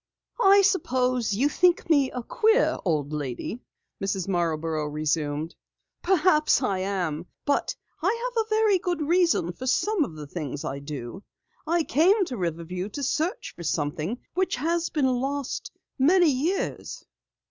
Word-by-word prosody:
"I 400 Hz, -1 st, +6 dB
suppose 255 Hz, -, +1 dB
you 260 Hz, +7 st, +2 dB
think 350 Hz, +3 st, +2 dB
me 285 Hz, -5 st, +4 dB
a 250 Hz, -, -5 dB
queer 445 Hz, -, +2 dB
old 155 Hz, -5 st, -1 dB
lady," 145 Hz, -, -4 dB, 0.4 s
Mrs. 195 Hz, -2 st, -1 dB
Marborough 165 Hz, -4 st, -1 dB
resumed. 150 Hz, +1 st, -2 dB, 0.5 s
"Perhaps 315 Hz, -6 st, +3 dB
I 195 Hz, -6 st, 0 dB
am, 180 Hz, -4 st, -2 dB, 0.2 s
but 285 Hz, -, 0 dB, 0.3 s
I 470 Hz, +2 st, 0 dB
have 450 Hz, -, +3 dB
a 440 Hz, -, -23 dB
very 435 Hz, -3 st, +3 dB
good 350 Hz, -3 st, -2 dB
reason 335 Hz, -, +2 dB
for 255 Hz, +8 st, -7 dB
some 410 Hz, +7 st, +2 dB
of 195 Hz, -, -6 dB
the 150 Hz, -1 st, -7 dB
things 145 Hz, -2 st, -5 dB
I 140 Hz, +1 st, -3 dB
do. 140 Hz, +2 st, -7 dB, 0.5 s
I 335 Hz, +1 st, +2 dB
came 370 Hz, -, +3 dB
to 260 Hz, -, -5 dB
Riverview 180 Hz, +2 st, -3 dB
to 285 Hz, +6 st, -6 dB
search 315 Hz, +7 st, -1 dB
for -, -, -10 dB
something 155 Hz, +6 st, -2 dB, 0.2 s
which 375 Hz, +1 st, 0 dB
has 335 Hz, +5 st, -1 dB
been 295 Hz, -4 st, 0 dB
lost 270 Hz, +2 st, -2 dB, 0.3 s
many 340 Hz, +4 st, +5 dB
years." 315 Hz, +9 st, -2 dB
255 Hz, 145 wpm, -26 LUFS, -, 0.5 s, I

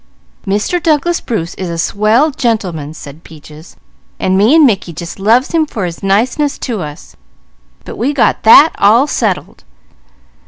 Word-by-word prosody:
"Mr. 210 Hz, -, -1 dB
Douglas 330 Hz, +1 st, 0 dB
Bruce 175 Hz, -9 st, -4 dB
is 185 Hz, -2 st, -4 dB
a 170 Hz, -, -5 dB
swell 215 Hz, -, +1 dB
gentl'man," 190 Hz, -, -3 dB
said 150 Hz, +1 st, -12 dB
Peaches, 155 Hz, +1 st, -15 dB, 0.4 s
"and 185 Hz, -, 0 dB
me 215 Hz, +10 st, +3 dB
and 320 Hz, -2 st, +6 dB
Mickey 195 Hz, -8 st, -1 dB
just 170 Hz, +4 st, -8 dB
loves 230 Hz, +7 st, +2 dB
him 320 Hz, -2 st, +1 dB
for 205 Hz, -9 st, -4 dB
his 170 Hz, -1 st, -7 dB
niceness 240 Hz, +9 st, 0 dB
to 230 Hz, -7 st, -4 dB
us; 150 Hz, -1 st, -10 dB, 0.7 s
but -, -, -9 dB
we 260 Hz, +5 st, 0 dB
got 285 Hz, -4 st, +1 dB
that 285 Hz, +8 st, +7 dB
all 230 Hz, +7 st, +4 dB
settled. -, -, -3 dB
215 Hz, 155 wpm, -13 LUFS, 170-275 Hz, 0.7 s, that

